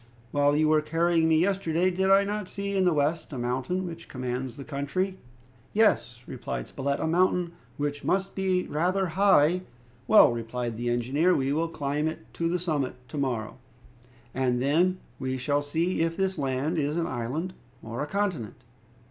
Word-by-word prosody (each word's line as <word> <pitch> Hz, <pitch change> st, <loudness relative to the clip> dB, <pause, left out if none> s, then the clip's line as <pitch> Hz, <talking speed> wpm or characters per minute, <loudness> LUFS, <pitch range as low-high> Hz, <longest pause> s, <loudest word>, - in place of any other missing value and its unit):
"While 145 Hz, 0 st, +3 dB
you 155 Hz, +1 st, +3 dB
were 155 Hz, 0 st, +4 dB
carrying 165 Hz, +1 st, +2 dB
me 160 Hz, -, +4 dB
yesterday, 185 Hz, -1 st, +1 dB
did 190 Hz, +2 st, +1 dB
I 195 Hz, +1 st, +6 dB
not 205 Hz, -1 st, -3 dB
see 200 Hz, +1 st, -4 dB
in 190 Hz, -1 st, +3 dB
the 180 Hz, -, +4 dB
west 155 Hz, +3 st, 0 dB
a -, -, -4 dB
mountain 130 Hz, +10 st, -1 dB
which 170 Hz, -1 st, -8 dB
commands 125 Hz, -1 st, -4 dB
the 140 Hz, -, -7 dB
country?" 170 Hz, +8 st, -2 dB, 0.5 s
"Yes," 130 Hz, -, +2 dB
replied -, -, -5 dB
Spilett, 140 Hz, +1 st, -2 dB
"a -, -, -1 dB
mountain 175 Hz, +1 st, +2 dB, 0.3 s
which 145 Hz, 0 st, -2 dB
must 190 Hz, +1 st, 0 dB
be 185 Hz, -1 st, 0 dB
rather 180 Hz, +4 st, 0 dB
high 180 Hz, -2 st, +4 dB, 0.2 s
" 120 Hz, +1 st, -30 dB
"Well," -, -, +7 dB
replied 120 Hz, 0 st, -4 dB
the 120 Hz, +1 st, -2 dB
engineer, 135 Hz, +9 st, +2 dB
"we 135 Hz, +1 st, 0 dB
will 165 Hz, +2 st, +1 dB
climb 150 Hz, 0 st, -2 dB, 0.2 s
to 165 Hz, 0 st, -1 dB
the 180 Hz, -, +1 dB
summit 155 Hz, -7 st, -1 dB
to 145 Hz, -, -4 dB
morrow, 120 Hz, -5 st, -2 dB, 0.7 s
and 125 Hz, -2 st, +1 dB
then 165 Hz, +8 st, +2 dB, 0.2 s
we 130 Hz, -1 st, -2 dB
shall 145 Hz, +3 st, 0 dB
see 160 Hz, +5 st, -1 dB
if 165 Hz, 0 st, 0 dB
this 190 Hz, -1 st, 0 dB
land 140 Hz, +4 st, -1 dB
is 150 Hz, +2 st, -1 dB
an 170 Hz, -, +1 dB
island 130 Hz, +9 st, -3 dB, 0.3 s
or 115 Hz, +3 st, -5 dB
a 150 Hz, -, -2 dB
continent. 180 Hz, -, -2 dB
155 Hz, 175 wpm, -27 LUFS, 130-180 Hz, 0.7 s, Well